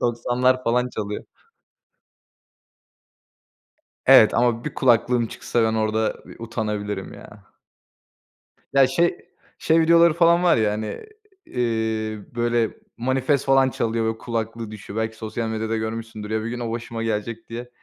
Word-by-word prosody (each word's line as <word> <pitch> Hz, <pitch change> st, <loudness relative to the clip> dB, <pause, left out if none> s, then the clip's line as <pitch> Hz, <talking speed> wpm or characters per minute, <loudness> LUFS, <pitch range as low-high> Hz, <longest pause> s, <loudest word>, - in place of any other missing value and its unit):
90'lar 125 Hz, +2 st, +1 dB
falan 125 Hz, +2 st, +1 dB
çalıyor. 105 Hz, -3 st, -5 dB, 2.8 s
Evet -, -, +7 dB
ama 120 Hz, -1 st, +1 dB
bir 150 Hz, -, -4 dB
kulaklığım 120 Hz, -1 st, +2 dB
çıksa, 115 Hz, +1 st, -1 dB
ben 110 Hz, 0 st, +1 dB
orada 110 Hz, 0 st, 0 dB
bir, -, -, -15 dB
ııı, -, -, -11 dB
utanabilirim 105 Hz, -4 st, -4 dB
ya. -, -, -12 dB, 1.4 s
Ya, 135 Hz, -1 st, +6 dB
şey, 170 Hz, +6 st, +1 dB, 0.4 s
şey 160 Hz, +1 st, +3 dB
videoları 170 Hz, 0 st, +5 dB
falan 170 Hz, +1 st, +4 dB
var 175 Hz, -7 st, +4 dB
ya, 110 Hz, -2 st, +2 dB
hani, 105 Hz, -, -5 dB, 0.4 s
iii, 110 Hz, -3 st, -2 dB
böyle, 120 Hz, -1 st, +1 dB, 0.3 s
Manifest 130 Hz, +3 st, 0 dB
falan 135 Hz, -1 st, +4 dB
çalıyor 115 Hz, -2 st, -1 dB
ve -, -, -17 dB
kulaklığı 115 Hz, -1 st, -4 dB
düşüyor. 105 Hz, 0 st, -7 dB
Belki 110 Hz, 0 st, -3 dB
sosyal 110 Hz, +1 st, -4 dB
medyada 110 Hz, 0 st, -2 dB
görmüşsündür. 110 Hz, -1 st, -5 dB
Ya, 110 Hz, 0 st, -1 dB
bir 115 Hz, -, -3 dB
gün 125 Hz, +1 st, -5 dB
o 115 Hz, -2 st, -3 dB
başıma 115 Hz, 0 st, -5 dB
gelecek 115 Hz, +1 st, -3 dB
diye, 120 Hz, +1 st, -7 dB
115 Hz, 140 wpm, -23 LUFS, 110-125 Hz, 2.8 s, Evet